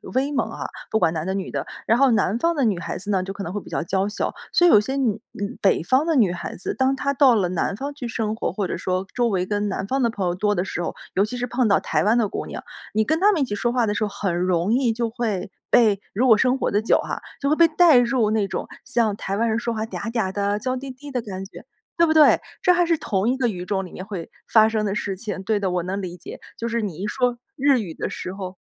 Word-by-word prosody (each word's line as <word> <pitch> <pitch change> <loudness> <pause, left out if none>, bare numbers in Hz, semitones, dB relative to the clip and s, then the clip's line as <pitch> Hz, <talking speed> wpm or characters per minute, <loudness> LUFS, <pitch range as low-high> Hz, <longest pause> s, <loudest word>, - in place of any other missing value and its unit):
威 275 +3 +1
猛 280 - 0
啊， - - -6 0.2
不 220 - +1
管 165 - +2
男 160 -1 -3
的 190 - 0
女 195 -1 -4
的。 - - -3 0.2
然 225 - +3
后 270 0 +5
南 215 -1 +2
方 335 +3 +1
的 285 - +1
女 200 -5 +1
孩 - - -4
子 200 +2 -8
呢， 190 -2 +1
就 195 - -5
可 200 - -6
能 175 +1 -5
会 205 - -3
比 - - -13
较 - - -2
娇 190 +3 0
小， 210 - -2 0.2
所 350 - +5
以 - - +6
有 - - +8
些 265 +6 -3
女 230 -6 0
女 205 +5 -5
北 195 - +3
方 260 - +2
的 330 -2 +1
女 210 -9 +4
孩 175 - -5
子， 180 - -4
当 265 0 +1
她 280 +1 -1
到 265 -3 +5
了 190 -5 +1
南 185 +2 -1
方 280 +6 -5
去 275 -4 -6
生 220 -2 -2
活， - - -2
或 195 -1 -2
者 - - -3
说 185 +1 -2
周 240 -1 +1
围 185 -5 0
跟 205 +1 -1
南 190 0 -3
方 270 +3 0
的 235 - +3
朋 205 -4 -3
友 175 - -1
多 205 +2 +1
的 180 +1 0
时 175 - -4
候。 - - -3 0.2
尤 195 - +4
其 245 +4 -6
是 245 - -2
碰 245 -1 +1
到 200 - +4
台 - - 0
湾 220 +4 +3
的 225 - +2
姑 - - -4
娘， - - -7 0.3
你 220 +1 +3
跟 315 +8 0
她 410 +3 +5
们 335 - 0
一 270 - +3
起 205 - -4
说 240 +3 0
话 245 -1 +2
的 205 - 0
时 210 - -1
候， 210 - 0
很 195 -3 -2
容 180 +3 +1
易 250 -2 +2
就 230 0 -1
会 215 -6 -3 0.2
被 215 -4 +4
如 245 +6 +2
果 220 -3 +7
生 255 +3 +2
活 - - -1
得 205 +2 +2
久 225 - +3
哈， - - -4 0.2
就 280 - +1
会 305 - +3
被 335 +1 +6
带 325 -2 +5
入 240 -3 +2
那 215 -2 +1
种 - - -4 0.2
像 225 -4 +1
台 195 -1 -3
湾 230 +1 +1
人 220 +1 +1
说 235 -1 -2
话 220 0 -2
嗲 225 0 -5
嗲 220 -6 -1
的 205 +1 -1
娇 255 +3 -2
滴 270 +1 -6
滴 280 +3 -11
的 250 -2 -1
感 195 -3 -6
觉， - - -12 0.3
对 335 - +5
不 315 - +3
对？ 310 -1 +6 0.2
这 360 - +5
还 350 0 +3
是 335 -1 +2
同 200 -4 0
一 260 - +1
个 255 - +1
语 180 -5 -4
种 195 -1 -1
里 180 - -11
面 185 - -8
会 185 -6 -6 0.2
发 220 -1 +5
生 215 -1 -1
的 200 - -1
事 200 -2 -2
情， 195 -1 -5
对 210 0 +1
的， 190 -2 -1
我 180 -1 -1
能 195 +3 -3
理 180 -2 -6
解， - - -9 0.2
就 230 - -3
是 235 0 -1
你 195 -7 -4
一 195 +4 -3
说 245 +1 0 0.2
日 275 -2 +3
语 180 -7 -5
的 - - -4
时 180 - -6
候 185 -1 -7
215 Hz, 320 characters per minute, -23 LUFS, 195-255 Hz, 0.3 s, 有